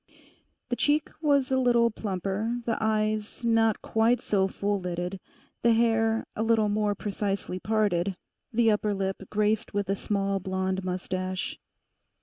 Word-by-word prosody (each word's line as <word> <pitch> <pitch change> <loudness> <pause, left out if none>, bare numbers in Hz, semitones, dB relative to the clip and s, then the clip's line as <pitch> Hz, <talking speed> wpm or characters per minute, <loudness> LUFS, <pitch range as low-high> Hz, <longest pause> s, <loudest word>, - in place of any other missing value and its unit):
The 245 - 0
cheek 295 +4 +1
was 280 -3 +2
a 260 - +3
little 240 -2 +4
plumper, 205 +3 -2
the 230 - +1
eyes 215 +1 -1
not 225 -2 +3
quite 225 +2 +2
so 195 -2 +1
full 200 +1 -1
lidded, 180 +1 -4 0.4
the 235 0 +5
hair 225 -1 +2
a - - -2
little 220 -2 +3
more 205 0 +1
precisely 200 -2 -3
parted, 200 -4 0 0.3
the 230 -1 +4
upper 210 -1 0
lip 195 0 -2
graced 215 +1 0
with 200 -2 -1
a 195 - +2
small 195 -1 -1
blonde 190 0 -2
moustache. 185 0 -3
210 Hz, 140 wpm, -27 LUFS, 195-225 Hz, 0.4 s, the